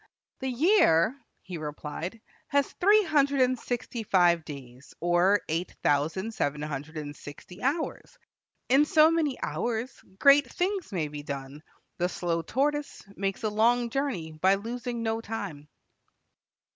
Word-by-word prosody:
"The 265 Hz, -, -2 dB
year," 255 Hz, -, +4 dB, 0.3 s
he 180 Hz, -3 st, -7 dB
replied, 155 Hz, +6 st, -6 dB, 0.3 s
"has 280 Hz, -1 st, +2 dB
three 415 Hz, +3 st, +6 dB
hundred 285 Hz, -5 st, +2 dB
and 255 Hz, -1 st, +2 dB
sixty 240 Hz, -1 st, -4 dB
five 175 Hz, -5 st, +3 dB
days, 135 Hz, -3 st, -11 dB
or 175 Hz, +4 st, +3 dB
eight 165 Hz, +3 st, -3 dB
thousand 160 Hz, +10 st, +1 dB
seven 150 Hz, -5 st, -2 dB
hundred 150 Hz, +1 st, -5 dB
and 145 Hz, -1 st, -6 dB
sixty 160 Hz, +7 st, -11 dB
hours. 290 Hz, +6 st, -2 dB, 0.5 s
In 275 Hz, +4 st, +5 dB
so 310 Hz, +1 st, +5 dB
many 310 Hz, -5 st, 0 dB
hours 240 Hz, +1 st, -2 dB, 0.2 s
great 280 Hz, 0 st, +5 dB
things 380 Hz, 0 st, -2 dB
may 170 Hz, -6 st, -1 dB
be 145 Hz, 0 st, -7 dB
done; 140 Hz, 0 st, -7 dB, 0.4 s
the 175 Hz, +1 st, +1 dB
slow 170 Hz, -2 st, -1 dB
tortoise 290 Hz, -, -1 dB
makes 195 Hz, +2 st, -3 dB
a 215 Hz, -, +1 dB
long 235 Hz, +3 st, +2 dB
journey 240 Hz, -, -2 dB
by 185 Hz, +5 st, +3 dB
losing 235 Hz, +3 st, -4 dB
no 225 Hz, 0 st, -1 dB
time." 200 Hz, -10 st, -6 dB
205 Hz, 140 wpm, -28 LUFS, 160-265 Hz, 0.5 s, three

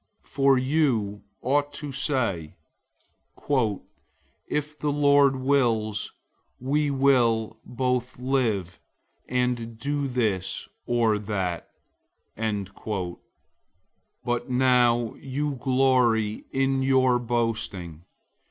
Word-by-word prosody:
004:015 -, -, -23 dB
For 135 Hz, -1 st, +4 dB
you 125 Hz, -7 st, +1 dB, 0.2 s
ought 145 Hz, +3 st, +1 dB
to 145 Hz, 0 st, -6 dB
say, 120 Hz, -, -1 dB, 1.9 s
"If 150 Hz, 0 st, -3 dB
the 150 Hz, -, 0 dB
Lord 140 Hz, -1 st, +4 dB
wills, 120 Hz, -6 st, +1 dB, 0.5 s
we 145 Hz, +3 st, 0 dB
will 120 Hz, -5 st, +2 dB
both 125 Hz, 0 st, -2 dB
live, 115 Hz, -9 st, -1 dB, 0.5 s
and 125 Hz, -2 st, -1 dB
do 140 Hz, +3 st, -2 dB
this 105 Hz, -7 st, -1 dB, 0.2 s
or 115 Hz, -3 st, +2 dB
that." 95 Hz, -5 st, -3 dB, 0.7 s
004:016 100 Hz, -3 st, -4 dB, 1.1 s
But 120 Hz, +1 st, -1 dB
now 125 Hz, -2 st, +3 dB
you 140 Hz, +1 st, -3 dB
glory 125 Hz, -4 st, +2 dB
in 135 Hz, 0 st, +1 dB
your 130 Hz, -2 st, +3 dB
boasting. 110 Hz, -9 st, -2 dB
125 Hz, 90 wpm, -25 LUFS, 110-135 Hz, 1.9 s, For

